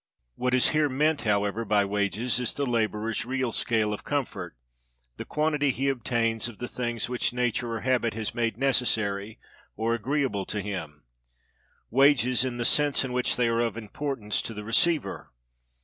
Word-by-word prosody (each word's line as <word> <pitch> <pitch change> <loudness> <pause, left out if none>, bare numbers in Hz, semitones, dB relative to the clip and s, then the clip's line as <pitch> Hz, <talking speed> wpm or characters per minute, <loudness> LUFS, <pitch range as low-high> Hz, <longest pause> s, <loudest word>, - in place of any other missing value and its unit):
What 125 - 0
is 130 - +4
here 155 -1 +2
meant, 150 +3 +1
however, 105 +1 +1
by 105 -2 +2
wages, 105 +5 0
is 125 - -1
the 140 - -1
laborer's 110 -2 -1
real 130 0 -1
scale 110 -3 0
of 105 - -6
comfort; 100 - -3 0.6
the - - -6
quantity 150 -2 +1
he 135 +2 0
obtains 115 -3 0
of 120 -3 -10
the 125 - -5
things 120 -3 -3
which 125 0 -1
nature 120 -1 -1
or 110 - -4
habit 120 -3 +1
has 110 0 -3
made 115 -3 -1
necessary 110 -6 +1 0.4
or 115 +1 0
agreeable 120 -3 -1
to 105 - -3
him: 90 -7 -6 0.9
wages 130 -1 +4
in 125 -2 -3
the 120 - -1
sense 145 0 +3
in 125 - -5
which 125 0 +1
they 120 -1 +2
are 115 0 +1
of 115 -2 0
importance 115 -1 -3
to 115 - -6
the 105 - -6
receiver. 155 +9 +1
120 Hz, 170 wpm, -27 LUFS, 105-130 Hz, 0.9 s, is